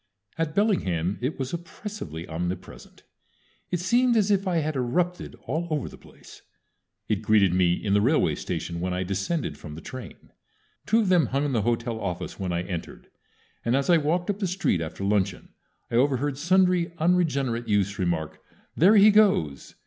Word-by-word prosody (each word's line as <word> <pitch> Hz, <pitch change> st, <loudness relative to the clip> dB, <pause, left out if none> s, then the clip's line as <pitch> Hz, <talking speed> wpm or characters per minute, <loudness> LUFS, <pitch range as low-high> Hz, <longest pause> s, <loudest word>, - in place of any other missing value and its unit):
At 165 Hz, -1 st, -2 dB
Bellingham 100 Hz, -, +1 dB
it 130 Hz, +5 st, -2 dB
was 130 Hz, +2 st, -4 dB
oppressively 170 Hz, -, -7 dB
omnipresent. 90 Hz, +3 st, -6 dB, 0.7 s
It 180 Hz, -, -1 dB
seemed 240 Hz, +6 st, +3 dB
as 210 Hz, -1 st, +2 dB
if 195 Hz, -1 st, +1 dB
I 180 Hz, -2 st, +1 dB
had 155 Hz, -1 st, -1 dB
erupted 170 Hz, +8 st, -1 dB
all 170 Hz, +2 st, -2 dB
over 150 Hz, -4 st, -1 dB
the -, -, -10 dB
place. -, -, -16 dB, 0.7 s
It 105 Hz, -2 st, 0 dB
greeted 105 Hz, -4 st, +3 dB
me 90 Hz, -1 st, +3 dB
in 100 Hz, +2 st, -1 dB
the 100 Hz, -, +4 dB
railway 140 Hz, +8 st, +2 dB
station 85 Hz, -1 st, -4 dB
when 90 Hz, +1 st, -2 dB
I 90 Hz, -, -1 dB
descended 100 Hz, -, -2 dB
from 75 Hz, 0 st, -9 dB
the -, -, -8 dB
train. 130 Hz, 0 st, -10 dB, 0.6 s
Two 225 Hz, +1 st, +4 dB
of 205 Hz, -, 0 dB
them 175 Hz, -7 st, +4 dB
hung 140 Hz, +2 st, 0 dB
in 145 Hz, -, -1 dB
the 115 Hz, -4 st, +1 dB
hotel 115 Hz, +1 st, -1 dB
office 90 Hz, -2 st, -5 dB
when 95 Hz, -2 st, -2 dB
I 85 Hz, 0 st, -1 dB
entered, 90 Hz, -2 st, -7 dB, 0.5 s
and 120 Hz, +2 st, +1 dB
as 140 Hz, +5 st, +1 dB
I 170 Hz, -, +6 dB
walked 170 Hz, +5 st, 0 dB
up 200 Hz, -, -7 dB
the 195 Hz, -, 0 dB
street 180 Hz, -, 0 dB
after 85 Hz, +4 st, -5 dB
luncheon 100 Hz, -2 st, 0 dB, 0.4 s
I 115 Hz, -, +1 dB
overheard 135 Hz, +2 st, +1 dB
sundry 180 Hz, 0 st, +2 dB
unregenerate 140 Hz, -9 st, +1 dB
youths 100 Hz, -1 st, 0 dB
remark, 85 Hz, -4 st, -2 dB, 0.4 s
"There 190 Hz, +7 st, +5 dB
he 210 Hz, +1 st, +8 dB
goes!" 190 Hz, -, +2 dB
130 Hz, 180 wpm, -26 LUFS, -, 0.7 s, he